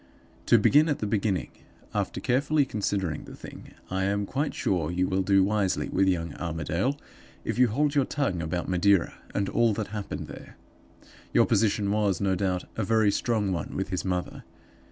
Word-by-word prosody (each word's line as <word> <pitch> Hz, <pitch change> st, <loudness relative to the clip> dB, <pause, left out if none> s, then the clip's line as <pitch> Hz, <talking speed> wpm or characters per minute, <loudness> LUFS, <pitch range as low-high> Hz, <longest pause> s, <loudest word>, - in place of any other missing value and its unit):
"To -, -, +7 dB
begin 150 Hz, +3 st, +5 dB
at 145 Hz, -, +1 dB
the -, -, -3 dB
beginning. 100 Hz, -2 st, -1 dB, 0.4 s
After -, -, -2 dB
carefully 140 Hz, +4 st, +2 dB
considering 100 Hz, -, -2 dB
the -, -, -10 dB
thing, -, -, -12 dB, 0.2 s
I 95 Hz, 0 st, 0 dB
am 100 Hz, +1 st, 0 dB
quite 140 Hz, +7 st, -2 dB
sure 85 Hz, -5 st, 0 dB
you 90 Hz, +1 st, 0 dB
will 95 Hz, 0 st, +1 dB
do 95 Hz, 0 st, +4 dB
wisely 100 Hz, -1 st, 0 dB
with 95 Hz, +1 st, +2 dB
young 85 Hz, -4 st, 0 dB
Armadale 85 Hz, -, -1 dB, 0.5 s
if -, -, -2 dB
you 125 Hz, -, +6 dB
hold 140 Hz, +6 st, +1 dB
your 140 Hz, -3 st, +3 dB
tongue 130 Hz, -14 st, -1 dB
about 85 Hz, +2 st, -3 dB
Madeira 95 Hz, 0 st, +3 dB, 0.2 s
and 100 Hz, -1 st, 0 dB
all 115 Hz, +1 st, +2 dB
that 105 Hz, -1 st, -3 dB
happened 105 Hz, -1 st, -5 dB
there. -, -, -11 dB, 0.8 s
Your -, -, +5 dB
position 105 Hz, -2 st, +1 dB
was, 105 Hz, -4 st, +1 dB
no 100 Hz, -1 st, +1 dB
doubt, 95 Hz, -1 st, -1 dB
a 110 Hz, -, -1 dB
very 110 Hz, 0 st, +3 dB
strong 105 Hz, -3 st, 0 dB
one 85 Hz, -, -4 dB
with 95 Hz, 0 st, -2 dB
his 90 Hz, -2 st, -2 dB
mother. 90 Hz, -1 st, -3 dB
100 Hz, 180 wpm, -27 LUFS, 90-110 Hz, 0.8 s, To